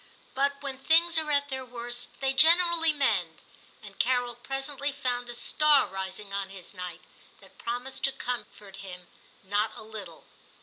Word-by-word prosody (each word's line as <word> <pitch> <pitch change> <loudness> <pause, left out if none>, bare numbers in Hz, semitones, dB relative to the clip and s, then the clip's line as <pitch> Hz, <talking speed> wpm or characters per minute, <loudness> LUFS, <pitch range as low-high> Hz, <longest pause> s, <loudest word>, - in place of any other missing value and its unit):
But 280 +1 +1
when 270 -2 -5
things 330 +3 +5
are 310 -1 -3
at 285 -1 +2
their 265 -1 -2
worst 240 -1 -5
they 270 0 +2
generally 330 +3 +6
mend, 205 - 0 0.4
and - - -13
Carol 245 -1 +1
presently 270 +3 -3
found 250 -3 -2
a 240 - -5
star 295 +4 +4
rising 190 +1 -6
on 200 -1 -2
his 190 -2 -10
night, 180 -2 -7 0.4
that - - -18
promised 245 +3 -3
to 270 - +1
comfort 210 -6 -6
him 180 -2 -9 0.4
not 205 +3 0
a - - -9
little. 210 -6 -9
245 Hz, 160 wpm, -28 LUFS, 205-280 Hz, 0.4 s, generally